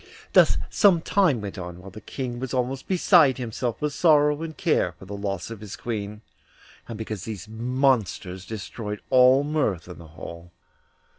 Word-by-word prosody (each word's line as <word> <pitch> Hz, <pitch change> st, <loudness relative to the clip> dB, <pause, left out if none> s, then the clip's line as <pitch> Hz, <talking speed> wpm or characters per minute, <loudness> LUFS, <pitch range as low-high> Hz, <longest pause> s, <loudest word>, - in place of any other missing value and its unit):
Thus -, -, +6 dB
some 190 Hz, -6 st, +4 dB
time 165 Hz, -, +2 dB
went 100 Hz, -1 st, -6 dB
on, 90 Hz, -1 st, -7 dB
while 95 Hz, +2 st, -11 dB
the 110 Hz, +3 st, -11 dB
King 125 Hz, -3 st, -5 dB
was 130 Hz, 0 st, -4 dB
almost 130 Hz, +1 st, -2 dB
beside 175 Hz, -7 st, +4 dB
himself 120 Hz, -1 st, -3 dB
with 150 Hz, -1 st, -2 dB
sorrow 150 Hz, -2 st, +4 dB
and 160 Hz, -1 st, -6 dB
care 150 Hz, -, +1 dB
for -, -, -14 dB
the 100 Hz, +2 st, -7 dB
loss 100 Hz, +1 st, -4 dB
of 110 Hz, -3 st, -8 dB
his 105 Hz, -1 st, -7 dB
Queen, 105 Hz, -2 st, -5 dB, 0.7 s
and 115 Hz, -, -6 dB
because 110 Hz, -4 st, -5 dB
these 105 Hz, -5 st, -6 dB
monsters 110 Hz, -5 st, -1 dB
destroyed 105 Hz, 0 st, -6 dB
all 130 Hz, +2 st, +6 dB
mirth 145 Hz, -, -1 dB
in 90 Hz, -, -10 dB
the 85 Hz, -, -12 dB
hall. 85 Hz, +2 st, -10 dB
115 Hz, 170 wpm, -25 LUFS, 100-135 Hz, 0.7 s, Thus